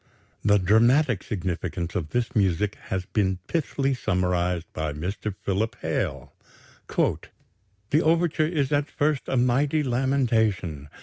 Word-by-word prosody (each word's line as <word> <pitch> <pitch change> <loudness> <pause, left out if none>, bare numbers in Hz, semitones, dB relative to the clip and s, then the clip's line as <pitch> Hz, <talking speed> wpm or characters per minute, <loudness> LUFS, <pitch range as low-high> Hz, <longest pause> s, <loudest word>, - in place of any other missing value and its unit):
The 105 0 +5
dramatic 115 - +3
significance 90 -2 -3
of 80 -7 -3
this 120 +7 -1
music 100 0 +2
has 95 -1 -3
been 95 -2 0
pithily 140 -4 0
summarized 90 -5 0
by 80 -1 -2
Mr. 95 +6 -4
Philip 100 +3 -1
Hale: - - -2 0.5
"The 100 - -3
overture 165 -1 +2
is 150 -5 -1
at 145 0 +1
first 150 -2 0
a 135 - 0
mighty 135 +5 +2
lamentation. 115 - 0
105 Hz, 120 wpm, -25 LUFS, 90-135 Hz, 0.5 s, The